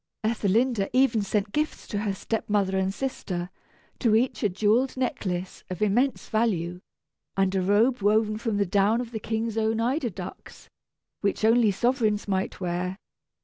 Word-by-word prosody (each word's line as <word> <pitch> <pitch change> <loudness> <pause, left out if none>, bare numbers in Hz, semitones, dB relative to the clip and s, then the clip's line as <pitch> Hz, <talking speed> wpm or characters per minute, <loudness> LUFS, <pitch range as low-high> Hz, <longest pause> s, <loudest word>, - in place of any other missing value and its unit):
Ethelinda 220 0 +1
even 255 -4 +4
sent 205 0 -1
gifts 305 +4 -2
to 205 - -2
her 205 -1 -1
step 220 +3 -3
mother 200 -2 +1
and 190 0 +1
sister; 185 -7 -4 0.5
to 225 -4 +3
each 245 +4 +1
a 210 - +2
jewelled 220 +8 +1
necklace 185 -8 -3
of 185 - -5
immense 235 +6 +1
value, 180 -6 0 0.6
and 195 -1 +2
a 190 - +1
robe 215 +6 +3
woven 215 +1 +3
from 225 -3 -1
the 200 - +2
down 200 +4 +2
of 245 -2 -5
the 220 - -4
King's 225 +1 -2
own 220 0 +1
eider 250 +3 0
ducks, 185 -1 -9 0.5
which 200 +1 0
only 225 0 +5
sovereigns 215 0 +1
might 190 -1 -1
wear. 180 +1 -2
215 Hz, 160 wpm, -26 LUFS, 195-230 Hz, 0.6 s, only